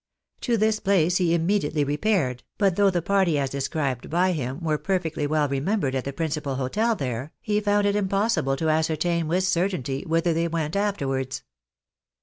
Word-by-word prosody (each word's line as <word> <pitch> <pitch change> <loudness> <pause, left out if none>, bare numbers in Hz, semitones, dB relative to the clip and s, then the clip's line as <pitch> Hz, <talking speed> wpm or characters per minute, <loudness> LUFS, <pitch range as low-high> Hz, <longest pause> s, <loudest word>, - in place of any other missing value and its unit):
To 235 -2 0
this 215 0 +2
place 180 -3 +2
he 175 -3 +1
immediately 165 -4 +1
repaired, 145 - 0 0.2
but 195 -3 +2
though 200 0 +4
the 175 -3 -1
party 190 -5 +2
as 135 -2 -1
described 140 -2 -2
by 180 +3 +2
him 135 -4 -3
were 155 -2 0
perfectly 165 -3 -1
well 150 0 +1
remembered 140 +2 -1
at 130 -1 -2
the 140 - -3
principal 150 -2 -3
hotel 210 - 0
there, 130 - -4
he 210 0 0
found 205 0 +2
it 200 0 +2
impossible 195 - +1
to 160 +2 0
ascertain 160 +1 +1
with 180 +4 +1
certainty 170 -8 0
whither 165 +1 +2
they 165 +1 0
went 160 -1 -2
afterwards. 135 -11 -1
165 Hz, 170 wpm, -25 LUFS, 140-195 Hz, 0.2 s, though